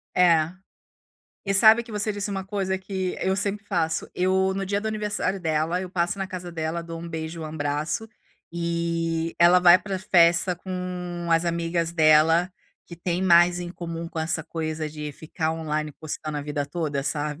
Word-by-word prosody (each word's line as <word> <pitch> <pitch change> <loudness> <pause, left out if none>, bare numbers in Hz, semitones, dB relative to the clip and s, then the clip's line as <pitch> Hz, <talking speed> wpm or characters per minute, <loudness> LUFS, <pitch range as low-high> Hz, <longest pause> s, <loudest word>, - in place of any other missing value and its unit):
É. 165 -3 +4 1.0
E 195 -1 0
sabe 220 +4 +7
que 230 -2 -12
você 210 +1 -1
disse 205 0 -3
uma 195 -1 -3
coisa 195 -1 -2
que 190 -1 -3
eu 190 +1 +1
sempre 200 0 -1
faço. 160 -5 -1
Eu 190 +1 +2
no 195 0 -3
dia 200 +1 0
do 220 - -3
aniversário 210 -2 -1
dela, 160 +1 0
eu 185 - -5
passo 175 +2 -1
na 195 - -2
casa 180 -2 -7
dela, 165 0 -3
dou 165 0 -7
um 170 - -7
beijo 160 0 -5
e - - -5
um - - -4
abraço, 155 +7 -2 0.4
e 170 -1 -1
ela 175 +1 +6
vai 180 0 +8
pra 195 -1 -4
festa 175 -1 +3
com 180 -2 -5
as 165 +1 +3
amigas 170 0 -1
dela, 160 +2 +4 0.3
que 170 - -11
têm 175 +1 -2
mais 175 -1 +5
em 175 0 -5
comum 170 -1 -6
com 165 - -7
essa 160 0 -1
coisa 155 -1 -4
de 150 -1 -6
ficar 160 +2 -3
online 155 -2 -3
postando 155 0 -6
a - - -4
vida 145 -1 -3
toda, 150 -3 -2
sabe. 150 +1 -2
170 Hz, 185 wpm, -25 LUFS, 160-185 Hz, 1.0 s, vai